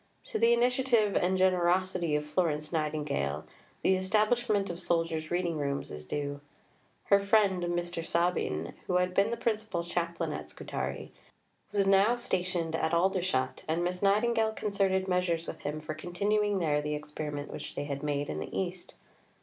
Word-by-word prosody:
To 450 Hz, -, -1 dB
the 230 Hz, -, +5 dB
initiative 240 Hz, -3 st, +3 dB
and 185 Hz, +1 st, +2 dB
generosity 185 Hz, -2 st, +2 dB
of 150 Hz, 0 st, -1 dB
Florence 150 Hz, -1 st, -1 dB
Nightingale, 150 Hz, -, -1 dB, 0.4 s
the 190 Hz, -, +4 dB
establishment 210 Hz, +2 st, +2 dB
of 175 Hz, +1 st, -6 dB
soldiers' 165 Hz, -2 st, 0 dB
reading 175 Hz, -3 st, 0 dB
rooms 140 Hz, -1 st, -2 dB
is 75 Hz, 0 st, -7 dB
due. 145 Hz, -, -3 dB, 0.6 s
Her 200 Hz, -, +5 dB
friend, 200 Hz, -2 st, +3 dB
Mr. 175 Hz, -1 st, -2 dB
Sabin, 170 Hz, -, 0 dB
who 180 Hz, -, +2 dB
had 180 Hz, 0 st, +1 dB
been 200 Hz, +3 st, +3 dB
the 235 Hz, -, -2 dB
principal 215 Hz, -6 st, -1 dB
chaplain 170 Hz, 0 st, -2 dB
at -, -, -6 dB
Scutari, -, -, -5 dB, 0.6 s
was 200 Hz, -1 st, +2 dB
now 195 Hz, +4 st, +5 dB
stationed 180 Hz, -7 st, -1 dB
at 160 Hz, +1 st, +1 dB
Aldershot, 175 Hz, -7 st, +1 dB
and 165 Hz, +2 st, 0 dB
Miss 180 Hz, +1 st, -2 dB
Nightingale 220 Hz, +2 st, +3 dB
concerted 195 Hz, -3 st, 0 dB
measures 180 Hz, -2 st, +1 dB
with -, -, -6 dB
him 150 Hz, +1 st, -3 dB
for 155 Hz, 0 st, -5 dB
continuing 205 Hz, +6 st, 0 dB
there 150 Hz, -5 st, +1 dB
the 150 Hz, 0 st, -2 dB
experiment 150 Hz, -1 st, -5 dB
which -, -, -7 dB
they -, -, -2 dB
had 140 Hz, -1 st, -4 dB
made 145 Hz, -1 st, -1 dB
in 75 Hz, -, -3 dB
the 80 Hz, -, -5 dB
East. 180 Hz, -1 st, -5 dB
175 Hz, 160 wpm, -30 LUFS, 155-200 Hz, 0.6 s, the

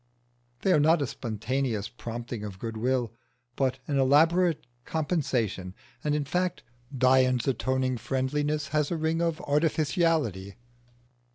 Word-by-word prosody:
They 190 Hz, -, +4 dB
are 150 Hz, -, +5 dB
not 155 Hz, +1 st, +4 dB
a -, -, 0 dB
spontaneous 120 Hz, -2 st, -2 dB
prompting 120 Hz, 0 st, -6 dB
of 100 Hz, -3 st, -6 dB
goodwill, 115 Hz, +2 st, -1 dB, 0.4 s
but 130 Hz, -1 st, 0 dB
an 140 Hz, -2 st, +1 dB
elaborate 160 Hz, +5 st, +4 dB, 0.2 s
compensation. 125 Hz, -, -1 dB, 0.3 s
And, 150 Hz, 0 st, +1 dB
in 150 Hz, -1 st, -1 dB
fact, 180 Hz, +4 st, -1 dB, 0.3 s
Dion's 130 Hz, -1 st, +3 dB
atoning 130 Hz, -1 st, 0 dB
friendliness 145 Hz, +4 st, -1 dB
has 150 Hz, -1 st, +1 dB
a 170 Hz, -, -1 dB
ring 160 Hz, +1 st, 0 dB
of 165 Hz, -1 st, 0 dB
artificiality. 150 Hz, -, +1 dB
135 Hz, 120 wpm, -28 LUFS, 120-155 Hz, 0.4 s, are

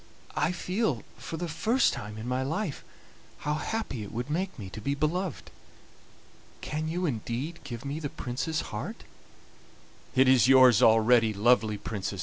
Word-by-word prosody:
I 150 Hz, +3 st, +1 dB
feel, 180 Hz, -, -1 dB, 0.2 s
for 165 Hz, -, -6 dB
the 175 Hz, +1 st, -3 dB
first 215 Hz, -, +2 dB
time 105 Hz, -2 st, -6 dB
in 110 Hz, +2 st, -6 dB
my 125 Hz, +1 st, 0 dB
life, 155 Hz, +4 st, -3 dB, 0.6 s
how 150 Hz, -, +1 dB
happy 155 Hz, -, -3 dB
it 100 Hz, -, -7 dB
would 120 Hz, +5 st, -4 dB
make 185 Hz, +3 st, -2 dB
me 100 Hz, -6 st, -7 dB
to 110 Hz, -, -7 dB
be 140 Hz, +6 st, -1 dB
beloved. 165 Hz, +5 st, -2 dB, 1.1 s
Can 155 Hz, +1 st, -3 dB
you 175 Hz, +3 st, -1 dB
indeed 135 Hz, +4 st, -3 dB
give 120 Hz, -2 st, -7 dB
me 140 Hz, +3 st, -3 dB
the 145 Hz, -3 st, -4 dB
Prince's 135 Hz, +7 st, -3 dB
heart?" -, -, -5 dB, 1.1 s
"It 130 Hz, +1 st, +5 dB
is 130 Hz, -2 st, +6 dB
yours 130 Hz, -3 st, +7 dB
already, 115 Hz, -1 st, +5 dB
lovely 110 Hz, 0 st, +3 dB
Princess!" 100 Hz, -2 st, -4 dB
135 Hz, 155 wpm, -28 LUFS, 115-160 Hz, 1.1 s, yours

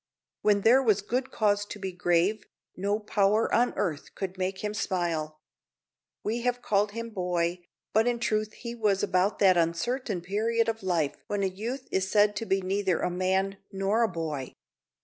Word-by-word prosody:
When 205 Hz, -1 st, +3 dB
there 245 Hz, +6 st, +6 dB
was 210 Hz, -5 st, +2 dB
good 250 Hz, +5 st, -1 dB
cause 205 Hz, -2 st, +1 dB
to -, -, -7 dB
be 190 Hz, -2 st, -4 dB
grave, 180 Hz, +3 st, +1 dB, 0.3 s
no 200 Hz, +3 st, 0 dB
power 210 Hz, 0 st, +2 dB
on 245 Hz, +1 st, +3 dB
earth 160 Hz, -7 st, -3 dB
could 190 Hz, -1 st, -4 dB
make 190 Hz, +1 st, -3 dB
him 210 Hz, 0 st, -2 dB
smile. 170 Hz, -7 st, -2 dB, 0.9 s
We 230 Hz, +3 st, -1 dB
have 245 Hz, 0 st, -1 dB
called 205 Hz, 0 st, +1 dB
him 230 Hz, 0 st, -5 dB
boy, 175 Hz, -2 st, -1 dB, 0.3 s
but 220 Hz, +2 st, +4 dB
in 240 Hz, -1 st, +1 dB
truth 215 Hz, -2 st, -1 dB
he 235 Hz, -1 st, -7 dB
was 210 Hz, -4 st, +1 dB
about 185 Hz, +3 st, +2 dB
that 190 Hz, -3 st, +5 dB
uncertain 180 Hz, +5 st, 0 dB
period 225 Hz, +5 st, 0 dB
of 225 Hz, 0 st, -2 dB
life 170 Hz, -6 st, 0 dB
when 205 Hz, -1 st, -1 dB
a -, -, +3 dB
youth 225 Hz, +8 st, -4 dB
is 190 Hz, 0 st, 0 dB
said 205 Hz, 0 st, +4 dB
to 225 Hz, -, -3 dB
be 195 Hz, 0 st, +2 dB
neither 190 Hz, -2 st, 0 dB
a -, -, 0 dB
man 190 Hz, +2 st, 0 dB
nor 195 Hz, +3 st, +1 dB
a 230 Hz, -, +4 dB
boy. 160 Hz, -7 st, -4 dB
200 Hz, 180 wpm, -28 LUFS, 185-220 Hz, 0.9 s, there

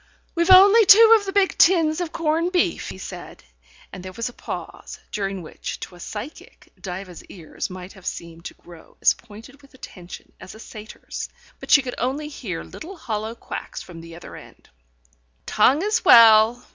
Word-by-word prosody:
"We've 340 Hz, +1 st, -1 dB
only 395 Hz, +4 st, +8 dB
two 450 Hz, +2 st, +8 dB
of 405 Hz, -, -11 dB
the -, -, -2 dB
big 390 Hz, -1 st, +1 dB
tins 330 Hz, -2 st, +3 dB
of 340 Hz, -2 st, -4 dB
corned 330 Hz, +2 st, -1 dB
beef," 355 Hz, -1 st, -1 dB
he -, -, -9 dB
said; 180 Hz, -1 st, -10 dB, 0.5 s
and 185 Hz, -, -9 dB
there 185 Hz, -, -8 dB
was 230 Hz, +2 st, -4 dB
a -, -, -15 dB
pause, -, -, -9 dB
during 195 Hz, -3 st, -4 dB
which, 155 Hz, -, -8 dB
to -, -, -8 dB
a 175 Hz, -, -15 dB
psychic, 215 Hz, -, -10 dB
Diva's 180 Hz, -1 st, -8 dB
ears 165 Hz, -5 st, -8 dB
might 185 Hz, 0 st, -10 dB
have 190 Hz, -3 st, -13 dB
seemed 170 Hz, 0 st, -8 dB
to -, -, -8 dB
grow 170 Hz, -2 st, -17 dB
as -, -, +4 dB
pointed 230 Hz, +7 st, -15 dB
with 275 Hz, -1 st, -21 dB
attention 180 Hz, -8 st, -12 dB
as 190 Hz, -, -12 dB
a -, -, -14 dB
satyr's. 215 Hz, -1 st, -9 dB, 0.3 s
But -, -, -12 dB
she 280 Hz, -, +5 dB
could 250 Hz, -, -6 dB
only 285 Hz, +4 st, -3 dB
hear 205 Hz, -, -7 dB
little 370 Hz, +4 st, -11 dB
hollow 220 Hz, -5 st, -5 dB
quacks -, -, -8 dB
from 170 Hz, -2 st, -12 dB
the 165 Hz, 0 st, -12 dB
other 175 Hz, -, -12 dB
end. -, -, -16 dB, 0.8 s
"Tongue 265 Hz, -, +2 dB
as 425 Hz, +2 st, 0 dB
well. 225 Hz, +1 st, +6 dB
230 Hz, 185 wpm, -22 LUFS, -, 0.8 s, only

